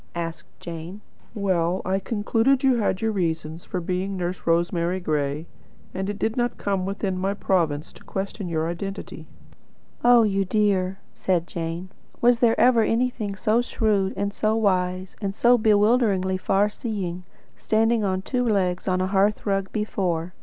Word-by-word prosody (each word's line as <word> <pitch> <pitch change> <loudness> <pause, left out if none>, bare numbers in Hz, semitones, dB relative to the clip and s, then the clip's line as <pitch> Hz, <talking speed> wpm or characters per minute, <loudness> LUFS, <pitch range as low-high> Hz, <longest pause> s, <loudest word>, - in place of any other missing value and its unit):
asked 165 -1 -5
Jane. 170 +4 -7 0.3
"Well, 185 -3 0
I 190 +1 +1
concluded 225 +6 +1
you 265 -2 +4
had 200 -4 0
your 225 0 +1
reasons 165 -4 -2
for 180 - -3
being 185 +3 -2
'Nurse 180 0 -4
Rosemary 170 +2 +1
Gray,' 150 -2 -1 0.5
and 190 +1 -3
it 205 - -3
did 220 +2 -1
not 240 -1 -1
come 195 -2 -1
within 195 -1 -2
my 195 +2 -1
province 165 -7 0
to - - -16
question 195 0 -4
your 160 -1 -1
identity." 195 +4 -6 0.8
"Oh, 240 -1 +7
you 195 -2 +1
dear!" 195 -2 +1 0.2
said 175 -3 0
Jane. 170 +1 -5 0.3
"Was 240 0 +4
there 230 -2 +3
ever 245 -2 +5
anything 225 -3 0
so 215 +5 +2
shrewd, 210 -5 0
and 200 0 -1
so 215 +1 +1
wise, 185 -3 0
and 195 -1 -2
so 240 +2 +5
bewilderingly 210 -3 +3
far 195 +2 +2
seeing, 195 -5 -4 0.3
standing 225 +1 +1
on 190 -1 -1
two 250 +2 -1
legs 190 -6 0
on 185 -1 +1
a - - +1
hearth 200 +2 +1
rug 195 -2 0
before! 180 -5 -2
195 Hz, 160 wpm, -24 LUFS, 180-215 Hz, 0.8 s, Oh